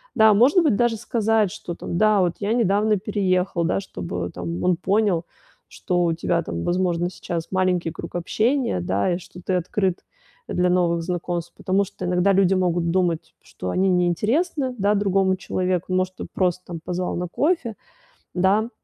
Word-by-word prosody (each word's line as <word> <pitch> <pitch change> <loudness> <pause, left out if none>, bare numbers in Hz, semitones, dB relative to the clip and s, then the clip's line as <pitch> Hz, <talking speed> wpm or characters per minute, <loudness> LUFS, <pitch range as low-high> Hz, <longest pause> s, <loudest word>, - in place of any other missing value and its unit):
Да, 220 -1 +6
может 260 - +5
быть, 300 -10 +3
даже 240 0 +1
сказать, 220 -2 +1
что, 175 -1 -7
там: 170 - -5
да, 215 +1 +4
вот 175 -2 +2
я 205 +1 -1
недавно 215 -2 +2
переехал. 185 -3 0
Да, 165 - +1
чтобы, 90 - -5
там, 85 0 -5
он 180 - +3
понял, 195 -1 +1 0.4
что 180 -2 -1
у 170 - +2
тебя, 170 +1 0
там, 85 - -4
возможно, 175 -1 0
сейчас 170 -2 -5
маленький 185 -3 +1
круг 165 - -8
общения, 220 - 0
да, 100 - 0
и - - -2
что 180 0 -12
ты 185 - -2
открыт, 185 +1 -1 0.5
э, - - -3
для 180 0 +2
новых 170 -2 +1
знакомств. 175 -1 -3
Потому 195 +2 0
что 185 - -10
иногда 180 +2 +2
люди 195 -1 +4
могут 175 -2 +1
думать, 175 -3 0
что 90 - -7
они 190 - +1
не 180 -1 +3
интересны, 255 - 0
да, 200 0 +2
другому 195 -2 +2
человеку, 185 -1 -2
может, 185 0 0
ты - - -5
просто, 180 -1 0
там, 170 -2 -6
позвал 180 +1 -2
на 180 0 -3
кофе, 280 - 0 0.6
да. 200 +5 +2
185 Hz, 180 wpm, -23 LUFS, 175-205 Hz, 0.6 s, Да